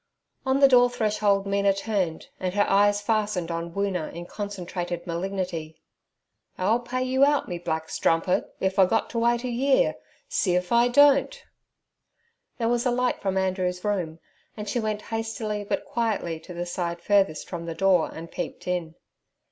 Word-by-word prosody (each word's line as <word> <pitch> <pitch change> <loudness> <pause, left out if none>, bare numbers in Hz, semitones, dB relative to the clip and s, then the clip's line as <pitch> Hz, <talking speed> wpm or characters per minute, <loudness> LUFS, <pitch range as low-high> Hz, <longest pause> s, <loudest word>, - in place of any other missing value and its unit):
On 265 +1 +3
the 275 - +9
door 245 -2 +6
threshold 210 -4 +1
Mina 200 0 +2
turned, 195 -5 -2
and 185 0 -2
her 205 - +3
eyes 205 +1 +3
fastened 205 -6 0
on 170 0 -4
Woona 195 -4 -2
in 170 +1 -7
concentrated 180 -3 -5
malignity. 175 -2 -4 0.8
'I'll 210 +6 +2
pay 255 +1 -3
you 260 +1 +2
out, 290 0 +3
me 175 -1 -4
black 160 -2 -3
strumpit, 165 +3 0
if 190 0 0
I 190 - +7
got 225 +4 0
t' 230 - -1
wait 235 +1 +2
a - - -2
year. 265 +3 +2 0.3
See 180 -3 +1
if 180 0 -1
I 235 +1 +5
don't.' 285 - +4 1.1
There 230 - 0
was 240 +2 +1
a - - +2
light 250 +1 0
from 195 -1 -1
Andrew's 185 -1 -1
room, 180 -6 -1 0.4
and 210 0 -6
she 240 - -1
went 215 -2 -2
hastily 225 -2 -3
but 205 - -2
quietly 210 -8 -2
to 170 +3 -11
the 175 +1 -3
side 175 -1 -3
furthest 195 -4 +1
from 170 -2 -6
the 165 - -4
door 185 -1 +3
and 165 +1 -9
peeped - - -6
in. 175 -3 -2
200 Hz, 170 wpm, -25 LUFS, 175-230 Hz, 1.1 s, the